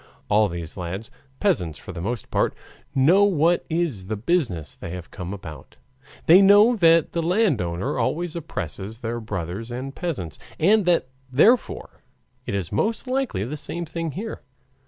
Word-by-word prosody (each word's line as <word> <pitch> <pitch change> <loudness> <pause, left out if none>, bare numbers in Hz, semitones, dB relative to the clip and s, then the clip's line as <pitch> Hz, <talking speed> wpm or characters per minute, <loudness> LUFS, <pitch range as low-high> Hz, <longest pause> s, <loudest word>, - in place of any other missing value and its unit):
All 105 0 +4
these 85 -1 -6
lads, 95 +5 -5 0.3
peasants 90 - +1
for - - -9
the 85 - -6
most 115 +5 -4
part, - - +1 0.4
know 165 +10 +5
what 175 -3 +3
is 160 - -1
the 110 - -2
business 105 - -1
they - - -8
have 90 0 -7
come 90 0 -6
about; 85 -6 -9 0.5
they 180 +4 +8
know 205 +4 +7
that 165 -5 +4
the 170 - -1
landowners 145 - 0
always 175 0 -1
oppress 165 -2 -5
their 115 +4 -5
brothers 105 0 -5
the 130 +3 -5
peasants, 135 - -4 0.2
and 205 +4 +4
that 175 -6 +3 0.3
therefore 220 - +2 0.5
it - - -2
is 95 -5 -3
most 225 +4 0
likely 255 - -1
the 140 +6 -4
same 170 +3 -5
thing 165 -1 -4
here. 220 +4 -5
135 Hz, 155 wpm, -24 LUFS, -, 0.5 s, they